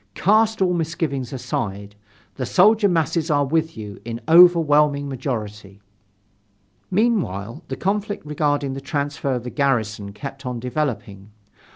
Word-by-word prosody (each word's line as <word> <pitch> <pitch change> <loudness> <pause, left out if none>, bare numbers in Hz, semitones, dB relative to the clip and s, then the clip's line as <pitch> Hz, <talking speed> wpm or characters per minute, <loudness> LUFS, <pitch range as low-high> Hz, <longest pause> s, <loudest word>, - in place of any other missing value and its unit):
Cast 220 +1 +3
all 180 -1 +2
misgivings 155 -6 -2
aside, 100 -5 -4 0.4
the 130 - -4
soldier 205 - +4
masses 165 -1 0
are 145 -2 +2
with 160 0 -1
you 105 -2 -8
in 115 0 -5
overwhelming 150 -4 +5
majority." 110 -7 -5 1.1
Meanwhile 165 - 0
the - - -4
conflict 205 0 -2
regarding 145 -2 -1
the 135 - -6
transfer 140 -1 -2
of 120 - -4
the 125 - -6
garrison 110 -7 -1
kept 135 +5 -8
on 125 -2 -4
developing. 120 -7 -4
140 Hz, 130 wpm, -22 LUFS, 115-165 Hz, 1.1 s, overwhelming